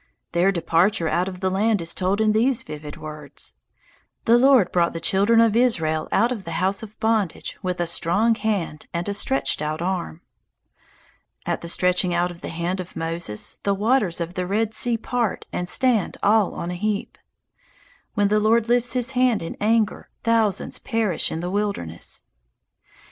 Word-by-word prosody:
Their 175 Hz, +3 st, +3 dB
departure 170 Hz, +1 st, +2 dB
out 175 Hz, +3 st, +1 dB
of 185 Hz, -1 st, -7 dB
the 190 Hz, -1 st, 0 dB
land 210 Hz, +2 st, +2 dB
is 165 Hz, -1 st, -3 dB
told 190 Hz, +2 st, 0 dB
in 220 Hz, -1 st, +3 dB
these 235 Hz, +3 st, +2 dB
vivid 150 Hz, -1 st, -8 dB
words: 150 Hz, -2 st, -8 dB, 0.7 s
"The 230 Hz, -, +5 dB
Lord 260 Hz, -7 st, +5 dB
brought 170 Hz, -1 st, +2 dB
the 165 Hz, -, -4 dB
children 200 Hz, +6 st, +3 dB
of 225 Hz, -2 st, +4 dB
Israel 160 Hz, -11 st, +1 dB
out 230 Hz, +5 st, +3 dB
of 220 Hz, -6 st, -4 dB
the -, -, -6 dB
house 190 Hz, +2 st, 0 dB
of 215 Hz, -1 st, -11 dB
bondage 220 Hz, -5 st, 0 dB
with 180 Hz, -1 st, -3 dB
a 175 Hz, -, +1 dB
strong 175 Hz, +7 st, +2 dB
hand 205 Hz, -8 st, -2 dB
and 170 Hz, +2 st, -2 dB
a 205 Hz, -, -1 dB
stretched 265 Hz, -, 0 dB
out 155 Hz, +1 st, -2 dB
arm." 175 Hz, -, -3 dB, 1.2 s
At -, -, -2 dB
the 170 Hz, -, -6 dB
stretching 180 Hz, 0 st, +2 dB
out 175 Hz, +1 st, +1 dB
of 175 Hz, -, -13 dB
the -, -, -5 dB
hand 170 Hz, +3 st, -2 dB
of 180 Hz, -1 st, -7 dB
Moses 165 Hz, -9 st, -3 dB
the 200 Hz, -1 st, +1 dB
waters 210 Hz, -4 st, +1 dB
of 170 Hz, +1 st, -4 dB
the 180 Hz, -1 st, -3 dB
Red 215 Hz, +3 st, 0 dB
Sea 235 Hz, +1 st, +1 dB
part 235 Hz, -1 st, -2 dB
and 180 Hz, 0 st, -2 dB
stand 240 Hz, -5 st, +1 dB
all 210 Hz, -1 st, +3 dB
on 170 Hz, -, -4 dB
a -, -, -3 dB
heap. 210 Hz, +2 st, -2 dB, 1.0 s
When 205 Hz, -2 st, +2 dB
the 210 Hz, +1 st, +3 dB
Lord 220 Hz, +2 st, +3 dB
lifts 245 Hz, 0 st, +2 dB
his 250 Hz, 0 st, 0 dB
hand 250 Hz, -6 st, +2 dB
in 165 Hz, -, -6 dB
anger, 220 Hz, 0 st, +1 dB
thousands 225 Hz, -3 st, +1 dB
perish 220 Hz, -7 st, 0 dB
in 160 Hz, -, -3 dB
the 180 Hz, +1 st, -3 dB
wilderness. 200 Hz, -, -3 dB
195 Hz, 180 wpm, -23 LUFS, 170-225 Hz, 1.2 s, The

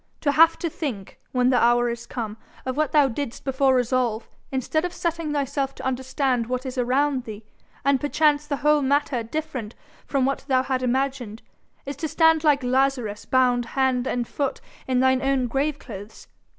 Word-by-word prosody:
To 285 Hz, -, +2 dB
have 330 Hz, +2 st, +5 dB
to 340 Hz, -, -2 dB
think, 260 Hz, -, -5 dB
when 250 Hz, 0 st, +2 dB
the 250 Hz, -, +3 dB
hour 240 Hz, 0 st, +4 dB
is 235 Hz, 0 st, -5 dB
come, 220 Hz, -3 st, -5 dB, 0.3 s
of 260 Hz, -1 st, -2 dB
what 305 Hz, -1 st, 0 dB
thou 295 Hz, -2 st, +5 dB
didst 265 Hz, 0 st, -5 dB
before 270 Hz, 0 st, +2 dB
resolve, 245 Hz, -2 st, 0 dB, 0.2 s
instead 270 Hz, +4 st, -1 dB
of 355 Hz, -, -3 dB
setting 335 Hz, -2 st, -2 dB
thyself 280 Hz, -1 st, -1 dB
to -, -, -8 dB
understand 260 Hz, -1 st, -1 dB
what 255 Hz, +1 st, -3 dB
is 260 Hz, 0 st, -5 dB
around 260 Hz, +1 st, +1 dB
thee, 215 Hz, -1 st, -9 dB, 0.4 s
and 275 Hz, -2 st, +3 dB
perchance 295 Hz, 0 st, +2 dB
the 285 Hz, -2 st, -1 dB
whole 300 Hz, 0 st, +5 dB
matter 280 Hz, -2 st, +1 dB
different 255 Hz, -2 st, -5 dB, 0.3 s
from 275 Hz, -2 st, +1 dB
what 275 Hz, +1 st, -1 dB
thou 260 Hz, -2 st, +3 dB
had 260 Hz, -1 st, -1 dB
imagined, 255 Hz, -3 st, -2 dB, 0.4 s
is 280 Hz, -1 st, -5 dB
to 315 Hz, -, -2 dB
stand 320 Hz, +1 st, +3 dB
like 290 Hz, -3 st, +3 dB
Lazarus 250 Hz, -4 st, 0 dB
bound 250 Hz, -2 st, +2 dB
hand 260 Hz, -1 st, +2 dB
and 240 Hz, -1 st, -1 dB
foot 280 Hz, -2 st, -2 dB, 0.3 s
in 255 Hz, -1 st, +2 dB
thine 260 Hz, 0 st, +3 dB
own 270 Hz, -2 st, +1 dB
graveclothes. 245 Hz, -6 st, -4 dB
265 Hz, 175 wpm, -24 LUFS, 245-285 Hz, 0.4 s, have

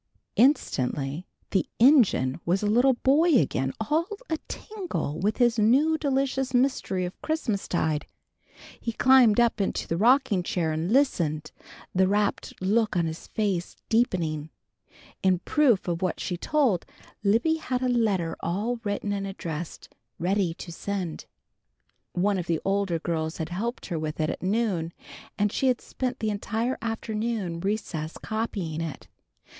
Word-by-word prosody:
_" -, -, -55 dB, 0.3 s
Instantly 145 Hz, -, +1 dB, 0.2 s
the 190 Hz, -, +1 dB
engine 220 Hz, -, +5 dB
was 185 Hz, +4 st, +1 dB
a -, -, +1 dB
little 245 Hz, +5 st, +4 dB
boy 295 Hz, +6 st, +4 dB
again 135 Hz, -, +1 dB
all 305 Hz, +10 st, +1 dB, 0.2 s
a 320 Hz, -, 0 dB
tingle 370 Hz, -, -4 dB
with 205 Hz, +4 st, +1 dB
this 240 Hz, -2 st, +3 dB
new 270 Hz, +9 st, +4 dB
delicious 270 Hz, -3 st, 0 dB
mystery 245 Hz, -8 st, +1 dB
of 180 Hz, -, -8 dB
Christmastide. 195 Hz, -, -1 dB, 0.7 s
He 230 Hz, -, -3 dB
climbed 250 Hz, -3 st, +5 dB
up 235 Hz, -3 st, +3 dB
into 195 Hz, -, -1 dB
the 165 Hz, -, -1 dB
rocking 230 Hz, -2 st, +4 dB
chair 175 Hz, -4 st, -1 dB
and 160 Hz, +5 st, -2 dB
listened, 170 Hz, -, +1 dB, 0.4 s
the 185 Hz, 0 st, +3 dB
rapt 205 Hz, +1 st, -1 dB
look 210 Hz, +2 st, +1 dB
on 170 Hz, -, +2 dB
his 160 Hz, 0 st, -5 dB
face 195 Hz, -5 st, -2 dB
deepening. 165 Hz, -10 st, +1 dB, 0.7 s
In 185 Hz, -1 st, +3 dB
proof 245 Hz, -, +2 dB
of 170 Hz, 0 st, -1 dB
what 185 Hz, -, -1 dB
she 180 Hz, -, -2 dB
told, 245 Hz, -, +1 dB, 0.4 s
Libby 235 Hz, +11 st, +3 dB
had 255 Hz, -5 st, -2 dB
a -, -, +2 dB
letter 210 Hz, -9 st, +1 dB
all 210 Hz, +8 st, -2 dB
written 205 Hz, -1 st, -2 dB
and 195 Hz, -1 st, -2 dB
addressed, 170 Hz, -4 st, -6 dB, 0.2 s
ready 180 Hz, -1 st, 0 dB
to 175 Hz, -, -8 dB
send. 180 Hz, -1 st, -4 dB, 0.9 s
One 195 Hz, +2 st, +1 dB
of 175 Hz, -, -5 dB
the 165 Hz, -2 st, +1 dB
older 195 Hz, -3 st, +1 dB
girls 160 Hz, -1 st, -2 dB
had 160 Hz, -1 st, -4 dB
helped 230 Hz, +7 st, -3 dB
her 170 Hz, -4 st, -3 dB
with 155 Hz, 0 st, -4 dB
it 155 Hz, 0 st, +1 dB
at -, -, -7 dB
noon, 185 Hz, -5 st, 0 dB, 0.4 s
and 205 Hz, 0 st, +2 dB
she 265 Hz, -, 0 dB
had 250 Hz, -1 st, +2 dB
spent 255 Hz, 0 st, -4 dB
the 215 Hz, -1 st, 0 dB
entire 225 Hz, +4 st, -2 dB
afternoon 220 Hz, -5 st, -2 dB
recess 170 Hz, -5 st, -3 dB
copying 200 Hz, -8 st, -3 dB
it. 160 Hz, -5 st, -6 dB
205 Hz, 150 wpm, -26 LUFS, 170-240 Hz, 0.9 s, engine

